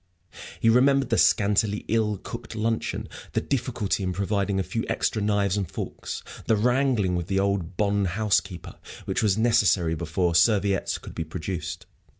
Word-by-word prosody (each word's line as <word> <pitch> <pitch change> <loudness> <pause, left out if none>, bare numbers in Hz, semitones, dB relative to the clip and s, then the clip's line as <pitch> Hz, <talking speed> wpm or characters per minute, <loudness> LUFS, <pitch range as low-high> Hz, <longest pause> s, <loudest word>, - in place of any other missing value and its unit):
He - - +1
remembered 135 +4 +4
the - - +3
scanty, 105 0 +2
ill 110 -2 +1
cooked 115 +3 -8
luncheon; 115 +1 -2 0.3
the - - +2
difficulty 120 -7 -1
in 90 -1 -1
providing 100 +1 -1
a - - +1
few 115 +4 -3
extra 110 - 0
knives 100 -1 +1
and 95 -4 -2
forks; - - -6 0.2
the 110 - +4
wrangling 120 -4 +2
with 85 -1 -3
the 95 0 0
old 95 -3 -1
bonne 100 -1 +1
housekeeper, 95 -2 -1 0.3
which - - -1
was 105 -3 +2
necessary 105 -7 +3
before 85 +2 -1
serviettes 100 0 +2
could - - -11
be 80 - -3
produced. 85 +2 -5
100 Hz, 155 wpm, -25 LUFS, 95-115 Hz, 0.3 s, remembered